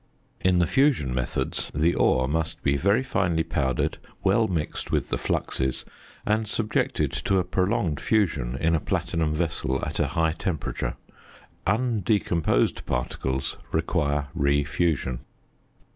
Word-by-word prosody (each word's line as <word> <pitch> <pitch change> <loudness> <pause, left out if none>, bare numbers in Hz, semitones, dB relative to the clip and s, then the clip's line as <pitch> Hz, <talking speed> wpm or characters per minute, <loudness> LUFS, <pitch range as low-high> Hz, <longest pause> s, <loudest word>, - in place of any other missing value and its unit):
In 90 0 +3
the 90 - +4
fusion 130 - +2
methods 65 -1 -2
the 80 +3 +3
ore 65 0 +3
must 80 +3 -2
be 70 0 +3
very 100 - +2
finely 90 -9 +1
powdered, 65 -4 -1 0.2
well 105 +3 +3
mixed 80 -6 -3
with - - 0
the - - 0
fluxes, 65 -1 -1 0.4
and 110 +1 +1
subjected 110 0 0
to 95 - 0
a 90 - +3
prolonged 90 -2 0
fusion 90 - +1
in 80 +1 +2
a 80 - +3
platinum 80 +1 -1
vessel 75 -5 -1
at - - -4
a - - +2
high 80 -1 +3
temperature. 80 -2 -3 0.7
Undecomposed 105 - +1
particles 65 +2 -2
require 75 -3 0
re 70 -3 +2
fusion. 75 -4 0
80 Hz, 130 wpm, -26 LUFS, 70-95 Hz, 0.7 s, the